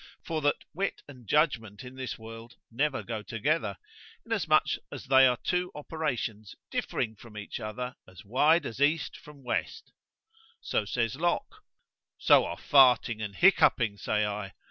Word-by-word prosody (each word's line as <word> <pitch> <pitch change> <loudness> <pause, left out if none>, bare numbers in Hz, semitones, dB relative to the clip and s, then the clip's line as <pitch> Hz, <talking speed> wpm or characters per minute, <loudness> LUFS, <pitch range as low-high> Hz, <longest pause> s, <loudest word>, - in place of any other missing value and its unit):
for 160 -2 -2
that 145 0 +3 0.2
wit 195 +4 -3
and 125 -5 -14
judgment 115 -9 +1
in 125 0 -10
this 130 -2 -5
world 115 +1 -11 0.2
never 140 +4 -1
go 110 -2 -4
together; 130 +10 -1 0.5
inasmuch 185 -10 +2 0.3
as - - -8
they 130 0 +6
are 125 -1 +1
two 180 0 0
operations 135 -9 -4 0.2
differing 110 -1 -2
from 110 0 -13
each 105 - -6
other 125 +4 -5
as 95 0 -14
wide 150 +8 +3
as 120 +3 -6
east 150 +2 +1
from 145 -2 -14
west——So, 445 - -5
says 115 +2 -1
Locke——so 175 +2 0
are 85 - -5
farting 125 -5 +4
and 100 -1 -6
hickuping, 120 - +4
say 105 +2 0
I. 100 -2 -4
125 Hz, 145 wpm, -29 LUFS, 110-155 Hz, 0.5 s, they